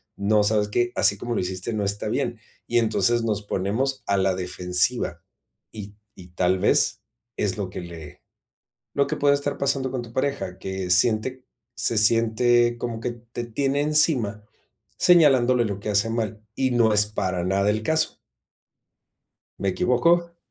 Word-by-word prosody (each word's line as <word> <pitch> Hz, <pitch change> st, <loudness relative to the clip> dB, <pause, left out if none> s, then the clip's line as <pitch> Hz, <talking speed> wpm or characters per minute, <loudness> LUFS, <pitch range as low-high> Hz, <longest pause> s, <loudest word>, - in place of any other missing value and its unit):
no, 105 Hz, +1 st, +2 dB
¿sabes 105 Hz, 0 st, +1 dB
qué? 120 Hz, +3 st, 0 dB
Así 100 Hz, -, +3 dB
como 120 Hz, +4 st, -4 dB
lo -, -, 0 dB
hiciste 95 Hz, +4 st, -4 dB
no 105 Hz, -1 st, -2 dB
está 100 Hz, +2 st, -2 dB
bien". 120 Hz, -1 st, -2 dB, 0.3 s
Y 120 Hz, -, +2 dB
entonces 115 Hz, +1 st, +1 dB
nos 105 Hz, -2 st, -1 dB
ponemos 110 Hz, +8 st, -2 dB
a 100 Hz, -, +1 dB
la 95 Hz, -1 st, +1 dB
defensiva, 90 Hz, +1 st, -1 dB, 0.5 s
y 105 Hz, -1 st, -9 dB, 0.2 s
y 90 Hz, -, -13 dB
tal 90 Hz, +1 st, +1 dB
vez -, -, +2 dB, 0.4 s
es 100 Hz, -2 st, -1 dB
lo 100 Hz, -3 st, -4 dB
que -, -, -6 dB
le 85 Hz, -4 st, -11 dB, 0.7 s
lo 140 Hz, -, +2 dB
que -, -, -2 dB
puede 140 Hz, 0 st, +3 dB
estar 140 Hz, 0 st, -3 dB
pasando 135 Hz, -1 st, 0 dB
con 130 Hz, -1 st, -4 dB
tu 115 Hz, -1 st, -12 dB
pareja, 125 Hz, -9 st, -3 dB
que 95 Hz, -1 st, -5 dB
siente 115 Hz, +7 st, +2 dB, 0.3 s
se 115 Hz, -2 st, 0 dB
siente 120 Hz, +2 st, +3 dB
como 115 Hz, -1 st, -5 dB
que 125 Hz, -, -3 dB
te 120 Hz, 0 st, -9 dB
tiene 135 Hz, +4 st, -1 dB
encima 145 Hz, -9 st, +2 dB, 0.5 s
señalándole 135 Hz, -9 st, +4 dB
lo 100 Hz, -2 st, -5 dB
que 105 Hz, -, -6 dB
hace 105 Hz, +2 st, +1 dB
mal, 110 Hz, -2 st, -3 dB
y 130 Hz, +1 st, 0 dB
no 115 Hz, -2 st, +3 dB
es 105 Hz, 0 st, +5 dB
para 95 Hz, -4 st, -3 dB
nada 100 Hz, +2 st, +1 dB
el 110 Hz, +1 st, -2 dB
caso. 160 Hz, +5 st, 0 dB, 1.4 s
¿Me 100 Hz, -, -1 dB
equivoco? 170 Hz, -, +1 dB
110 Hz, 165 wpm, -23 LUFS, 100-125 Hz, 1.4 s, es